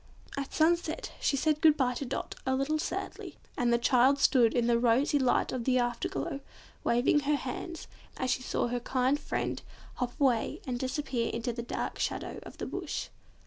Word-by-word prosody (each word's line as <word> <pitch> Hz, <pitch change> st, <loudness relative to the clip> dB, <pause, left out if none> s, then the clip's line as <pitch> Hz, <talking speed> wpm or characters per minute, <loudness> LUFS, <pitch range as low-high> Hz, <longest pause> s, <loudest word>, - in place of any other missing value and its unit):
At 275 Hz, 0 st, -4 dB
sunset 325 Hz, 0 st, +1 dB
she 275 Hz, -, +1 dB
said 305 Hz, +2 st, +1 dB
good 310 Hz, -2 st, +6 dB
bye 255 Hz, -3 st, +2 dB
to 275 Hz, -, -4 dB
Dot, -, -, -4 dB
a 260 Hz, 0 st, +1 dB
little 285 Hz, +4 st, 0 dB
sadly, 385 Hz, +5 st, -4 dB, 0.2 s
and 245 Hz, -3 st, +1 dB
the 235 Hz, -, +5 dB
child 255 Hz, +3 st, +4 dB
stood 250 Hz, -4 st, +4 dB
in 240 Hz, -1 st, +2 dB
the 235 Hz, 0 st, +3 dB
rosy 250 Hz, +5 st, +3 dB
light 255 Hz, -2 st, +2 dB
of 255 Hz, -2 st, -2 dB
the 255 Hz, +1 st, +2 dB
after 240 Hz, -1 st, 0 dB
glow, 140 Hz, -, -3 dB, 0.4 s
waving 245 Hz, +5 st, +3 dB
her 295 Hz, +1 st, +1 dB
hand, 290 Hz, +5 st, -5 dB, 0.3 s
as 255 Hz, -1 st, 0 dB
she -, -, 0 dB
saw -, -, -1 dB
her 245 Hz, +1 st, -1 dB
kind 255 Hz, +3 st, +1 dB
animal -, -, -16 dB
friend -, -, -2 dB, 0.4 s
hop 250 Hz, +3 st, -3 dB
away 255 Hz, -6 st, +2 dB
and 245 Hz, -2 st, -2 dB
disappear 260 Hz, -2 st, -1 dB
into 235 Hz, +1 st, -2 dB
the 235 Hz, -, -4 dB
dark 235 Hz, -, -4 dB
shadow -, -, -2 dB
of -, -, -11 dB
the -, -, -4 dB
Bush. -, -, -4 dB
255 Hz, 195 wpm, -30 LUFS, 240-285 Hz, 0.4 s, good